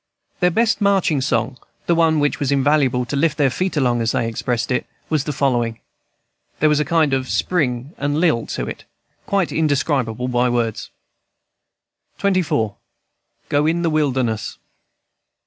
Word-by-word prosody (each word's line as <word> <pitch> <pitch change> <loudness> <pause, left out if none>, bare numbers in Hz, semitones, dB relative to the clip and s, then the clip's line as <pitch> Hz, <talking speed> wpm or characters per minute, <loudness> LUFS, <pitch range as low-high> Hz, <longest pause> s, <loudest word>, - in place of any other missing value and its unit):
Their 180 - +4
best 225 +4 +1
marching 190 -8 +2
song, 125 -1 -1 0.3
and 170 - +3
one 165 -2 +3
which 145 0 0
was 140 -1 0
invaluable 135 -3 +2
to 140 - -4
lift 150 +1 +1
their 140 -4 +3
feet 185 +3 -2
along, 120 -4 +2
as 115 0 0
they 115 - 0
expressed 120 +1 -2
it, 125 - -1 0.2
was 155 -3 +1
the 150 - -2
following. 120 -5 0 0.8
There 155 - +4
was 150 -1 +2
a 150 - +1
kind 155 -2 +2
of 130 -1 -1
spring 140 -5 -1
and 145 +1 0
lilt 160 -10 +1
to - - -3
it, - - -8 0.4
quite 195 -4 +1
indescribable 135 -6 0
by 125 0 +1
words. 120 -2 -2 1.3
XXIV. 175 - 0 0.7
GO 145 +1 +2
IN 170 +2 0
THE 165 - +1
WILDERNESS. 130 -8 -1
140 Hz, 155 wpm, -20 LUFS, 125-160 Hz, 1.3 s, Their